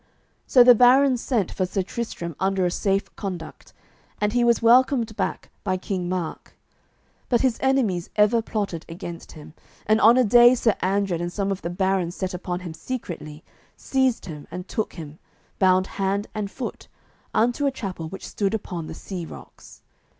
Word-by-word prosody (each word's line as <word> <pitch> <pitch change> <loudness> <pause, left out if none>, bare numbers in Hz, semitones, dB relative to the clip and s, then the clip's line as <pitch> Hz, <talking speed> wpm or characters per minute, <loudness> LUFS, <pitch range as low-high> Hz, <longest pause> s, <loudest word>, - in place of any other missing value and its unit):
So 250 - +7
the 245 0 +9
barons 250 +1 +5
sent 225 -8 0
for 185 - -1
Sir 190 +1 -1
Tristram 180 -6 -5
under 190 -1 +1
a 175 - +1
safe 195 +2 -1
conduct, 180 -5 -7 0.5
and 210 +1 0
he 245 0 +2
was 235 -1 +4
welcomed 235 -1 +4
back - - -3
by 185 - 0
King 185 -1 -3
Mark. 180 -3 -4 0.7
But 240 -2 +3
his 260 -3 +1
enemies 240 -10 +1
ever 210 +2 +4
plotted 205 -7 -3
against 170 0 -8
him, 155 -1 -12 0.3
and 215 +1 +3
on 230 +3 +7
a 255 - +5
day 240 +3 +7
Sir 230 -3 +2
Andred 190 -2 0
and 175 0 -3
some 200 +1 -2
of 195 - -3
the 170 - -4
barons 185 -1 0
set 190 -1 -3
upon 180 0 -4
him 175 -3 -7
secretly, 165 -8 -7 0.3
seized 265 -3 0
him, 150 -4 -9
and 180 +1 -7
took 220 - -3
him, 155 -2 -9 0.4
bound 185 -1 +4
hand 195 +1 -2
and 210 -2 -3
foot, 250 +3 -7 0.4
unto 245 +5 +1
a - - +1
chapel 185 -10 -6
which 195 - -8
stood 200 +1 -1
upon 175 -6 -5
the - - -7
sea 185 -1 -6
rocks. - - -13
195 Hz, 175 wpm, -24 LUFS, 180-235 Hz, 0.7 s, the